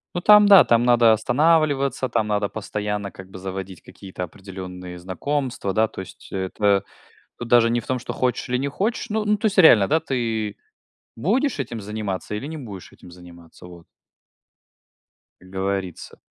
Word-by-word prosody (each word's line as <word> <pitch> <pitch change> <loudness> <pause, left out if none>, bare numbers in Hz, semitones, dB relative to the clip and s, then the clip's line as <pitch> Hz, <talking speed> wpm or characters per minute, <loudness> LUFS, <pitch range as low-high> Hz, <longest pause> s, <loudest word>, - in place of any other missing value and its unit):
Ну, 175 - -2
там 210 +1 +7
да. 200 -2 +9
Там 115 0 +2
надо 120 -2 +5
останавливаться, 140 +2 +2
там 110 - -1
надо 105 -1 0
постоянно 105 -1 -4
как 95 0 -12
бы 95 - -9
заводить 95 -1 -7
какие-то 95 -2 -9
определенные 90 -1 -9
знакомства. 110 - -3
Да, 110 +3 +2
то - - -8
есть 95 - -13
это 100 +1 0 0.6
тут 120 - -6
даже 115 -1 +5
не 120 +1 +1
в - - -15
том, 130 - -1
что - - -6
хочешь 125 -1 -2
или 125 - 0
не 140 +2 -2
хочешь, 220 - -2
ну 215 0 -1
ну, 210 0 +2
то 215 +2 -2
есть 205 -2 -1
реально, 120 - +7
да, 160 +2 +2
ты 115 -6 -3 0.6
будешь 235 - 0
этим 120 -4 -4
заниматься 105 -1 -5
или 115 +6 -5
не 160 +1 -6
будешь 105 -9 -10
этим - - -15
заниматься, 85 -1 -15
вот. 85 -1 -14 1.6
Как 95 - -17
говорится. 95 -1 -4
110 Hz, 175 wpm, -22 LUFS, 95-140 Hz, 1.6 s, да